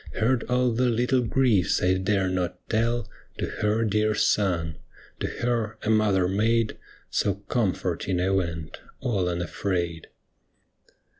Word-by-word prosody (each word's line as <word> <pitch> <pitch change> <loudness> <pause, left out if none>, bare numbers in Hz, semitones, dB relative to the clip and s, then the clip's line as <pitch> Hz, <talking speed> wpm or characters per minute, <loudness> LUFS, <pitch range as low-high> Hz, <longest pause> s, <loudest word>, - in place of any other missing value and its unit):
Heard 120 +4 +2
all 125 0 +2
the 125 +2 +2
little 125 +2 +2
griefs 115 -6 +2
I 90 +1 +3
dare 95 0 +1
not 90 -1 -3
tell 115 +2 +1 0.3
To - - -1
her 105 +2 0
dear 105 0 +1
Son. 85 -8 +1 0.4
To - - -1
her 115 -3 -2
a 110 - +1
mother 100 -4 +3
maid 110 +4 +1 0.4
So 100 -2 +1
comforting 95 -5 0
I 95 +2 +1
went, 85 -5 -2 0.2
all 100 -9 0
unafraid. 85 -1 -2
105 Hz, 130 wpm, -26 LUFS, 90-115 Hz, 0.4 s, I